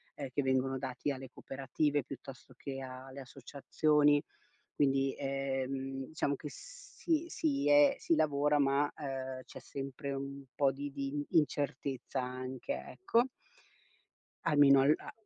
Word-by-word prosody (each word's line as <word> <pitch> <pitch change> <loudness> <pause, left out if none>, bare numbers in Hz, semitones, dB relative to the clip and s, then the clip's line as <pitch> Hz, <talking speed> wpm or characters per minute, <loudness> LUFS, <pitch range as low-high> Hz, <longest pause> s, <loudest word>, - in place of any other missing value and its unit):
ehm, 140 -2 -5
che 145 - +2
vengono 130 0 +1
dati 130 +2 -2
alle 130 -1 -6
cooperative 140 +2 -1
piuttosto 130 0 -10
che 135 -1 -5
a 130 0 -7
alle 135 +1 -8
associazioni. 145 +3 +2 0.5
Quindi, 135 -1 +2
ehm, 135 -1 -2
diciamo 145 -2 -1
che 150 - -7
si, 335 - -3
si 285 -4 0
è 290 -1 +7
si 335 - +2
lavora, 150 - +3
ma 140 +1 +3 0.6
c'è - - -10
sempre 140 +1 -5
un 140 0 -5
po' 140 -2 +4
di 140 +2 -5
di 140 +1 -3
incertezza 140 -4 0
anche, 130 - -4
ecco 240 -11 +2 1.2
almeno 145 -3 +6
al 145 +3 +5
a - - -9
140 Hz, 130 wpm, -33 LUFS, 135-145 Hz, 1.2 s, è